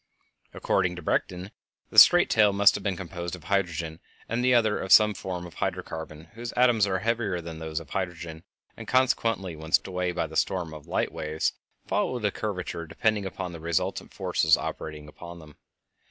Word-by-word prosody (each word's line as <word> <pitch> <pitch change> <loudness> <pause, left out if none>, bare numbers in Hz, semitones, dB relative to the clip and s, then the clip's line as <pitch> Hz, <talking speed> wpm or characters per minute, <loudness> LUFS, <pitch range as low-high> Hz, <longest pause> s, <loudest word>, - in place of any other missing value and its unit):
According 90 -2 0
to 90 - -9
Bredichin, 90 +4 -2 0.4
the - - +8
straight - - +8
tail 105 -2 +4
must 100 0 +6
have 100 - -5
been 95 -3 -1
composed 85 -1 -6
of 90 - -14
hydrogen, 85 -4 -2 0.3
and 115 +2 -1
the 125 - +3
other 110 -4 +3
of 95 - -5
some 105 -1 +7
form 90 -2 -5
of 85 - -11
hydro - - -2
carbon 80 0 -8
whose 115 +1 -6
atoms 120 -4 +3
are 95 -1 0
heavier 110 -2 -1
than 80 -1 -8
those 80 0 -4
of 80 - -13
hydrogen, 85 -4 -4 0.3
and, - - -10
consequently, 115 -8 +1
when 80 +1 -10
swept - - +4
away 90 -1 -2
by 90 - -2
the 80 0 -10
storm 85 -2 -1
of 75 -2 -11
light - - -1
waves, 80 0 -2 0.3
followed 120 -4 -1
a 105 - +2
curvature 90 -6 -4
depending 105 +3 0
upon 95 -1 -5
the 85 - -9
resultant 85 0 -2
of - - -31
the - - -22
forces 80 -1 +2
operating 75 -1 -6
upon 85 +3 -11
them. 75 -3 -14
90 Hz, 195 wpm, -26 LUFS, 80-105 Hz, 0.4 s, the